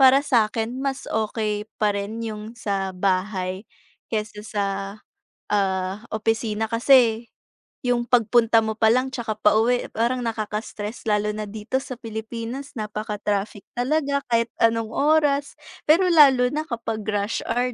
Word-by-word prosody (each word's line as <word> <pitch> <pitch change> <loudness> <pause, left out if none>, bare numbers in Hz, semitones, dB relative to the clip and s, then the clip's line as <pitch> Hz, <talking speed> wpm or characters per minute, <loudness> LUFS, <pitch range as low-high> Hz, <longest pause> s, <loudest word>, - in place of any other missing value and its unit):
para 265 +1 +7
sa'kin, 225 -2 +1
mas 275 -1 -2
okey 215 -1 -2
pa 210 -1 +3
rin 205 +3 -4
'yong 215 0 -6
sa 195 -3 -2
bahay, 185 +1 -1 0.5
kaysa 210 -1 -3
sa, 205 -2 -2 0.9
ah, 195 +1 0
opisina. 220 0 -1
Kasi, 235 -1 +4 0.6
'yong 245 -1 +1
pagpunta 230 -1 +4
mo 220 0 -2
pa 220 - +5
lang 255 +1 +1
'tsaka 225 -4 -3
pauwi 225 +4 +3
parang 240 +3 0
nakaka-stress, 215 -1 -4
lalo 210 0 +1
na 215 - -3
dito 220 +5 -3
sa 255 - -6
Pilipinas 230 +4 -6
napaka-traffic 210 -1 -3
talaga 280 +2 +1
kahit 230 0 +3
anong 230 -1 +3
oras, 290 -1 +2 0.3
pero 335 +5 +5
lalo 270 -6 +6
na 305 +1 -1
kapag 225 -3 -3
rush 205 0 -1
hour, 250 +1 0
225 Hz, 130 wpm, -23 LUFS, 210-245 Hz, 0.9 s, para